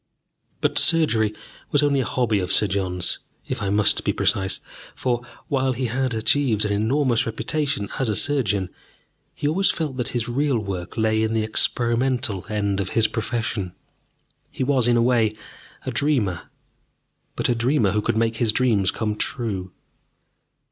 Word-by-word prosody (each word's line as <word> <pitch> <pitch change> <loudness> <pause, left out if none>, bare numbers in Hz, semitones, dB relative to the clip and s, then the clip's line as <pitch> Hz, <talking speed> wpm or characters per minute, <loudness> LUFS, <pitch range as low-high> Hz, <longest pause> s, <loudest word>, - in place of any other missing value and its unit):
But - - +2
surgery 115 -11 +4 0.4
was 145 0 +3
only 140 -1 +2
a 130 - 0
hobby 115 -5 +1
of 90 - -3
Sir - - +6
John's, 95 -2 -1 0.3
if - - -3
I 100 - -1
must 105 +1 +3
be - - +1
precise, 95 -1 0 0.4
for, 120 -2 -1 0.3
while 135 -1 +1
he 130 +1 -2
had 125 +1 -1
achieved 110 -1 +1
an 105 - -1
enormous 120 +3 +1
reputation 140 0 -2
as 130 -4 +1
a 105 - 0
surgeon, 105 -10 +1 0.6
he 145 - -2
always 190 +6 +2
felt 150 -6 -2
that 125 - 0
his 120 -2 -2
real 135 +2 +1
work 95 -4 -5
lay 110 0 +2
in 110 0 0
the 110 -1 +1
experimental 120 -1 0
end 100 -2 -1
of 95 -2 -2
his 115 - +5
profession. 110 -5 -3 0.7
He - - -3
was, 130 -3 +2
in 120 -1 +4
a 115 - +3
way, 115 -3 +2 0.5
a - - -2
dreamer, 120 - 0 0.9
but - - 0
a - - +2
dreamer 120 -2 +2
who 105 +1 0
could 105 - -1
make 115 0 +1
his 115 -2 +3
dreams 110 -6 +2
come 105 0 -1
true. 105 -7 -2
115 Hz, 165 wpm, -23 LUFS, 105-130 Hz, 0.9 s, Sir